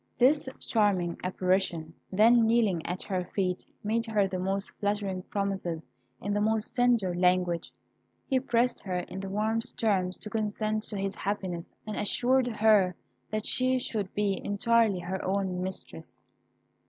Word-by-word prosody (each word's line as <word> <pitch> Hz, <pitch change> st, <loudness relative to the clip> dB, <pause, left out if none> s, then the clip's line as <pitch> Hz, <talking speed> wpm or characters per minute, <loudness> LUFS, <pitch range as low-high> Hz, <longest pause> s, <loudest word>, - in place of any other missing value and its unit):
This 270 Hz, +2 st, +4 dB
charming 195 Hz, -7 st, +1 dB
apparition 185 Hz, -3 st, 0 dB, 0.2 s
then 225 Hz, +4 st, +5 dB
kneeling 220 Hz, -8 st, +2 dB
at 180 Hz, +2 st, -3 dB
her 185 Hz, -2 st, -2 dB
feet, 180 Hz, 0 st, -2 dB, 0.2 s
made 225 Hz, +2 st, 0 dB
her 210 Hz, -3 st, +2 dB
the 185 Hz, -1 st, -3 dB
most 195 Hz, +2 st, -1 dB
flattering 200 Hz, -2 st, -1 dB
promises 190 Hz, -4 st, -3 dB, 0.3 s
in 205 Hz, -, -2 dB
the 205 Hz, -, +1 dB
most 220 Hz, 0 st, 0 dB
tender 240 Hz, -7 st, +3 dB
language. 180 Hz, -1 st, +1 dB, 0.5 s
He 265 Hz, -, +2 dB
pressed 250 Hz, -1 st, +1 dB
her 185 Hz, -2 st, -3 dB
in 180 Hz, +1 st, -5 dB
the 195 Hz, 0 st, -5 dB
warmest 220 Hz, +3 st, -1 dB
terms 185 Hz, -5 st, +1 dB
to 215 Hz, -, -6 dB
consent 215 Hz, 0 st, -1 dB
to 210 Hz, -, -4 dB
his 195 Hz, 0 st, -2 dB
happiness, 185 Hz, -4 st, -4 dB
and 215 Hz, -1 st, -5 dB
assured 250 Hz, +4 st, +2 dB
her 215 Hz, -5 st, +4 dB, 0.3 s
that 215 Hz, 0 st, -2 dB
she 255 Hz, 0 st, +3 dB
should 215 Hz, -6 st, -2 dB
be 200 Hz, -2 st, 0 dB
entirely 210 Hz, -1 st, +2 dB
her 185 Hz, +2 st, -4 dB
own 190 Hz, -1 st, -1 dB
mistress. 180 Hz, -, -7 dB
200 Hz, 150 wpm, -29 LUFS, 185-220 Hz, 0.5 s, then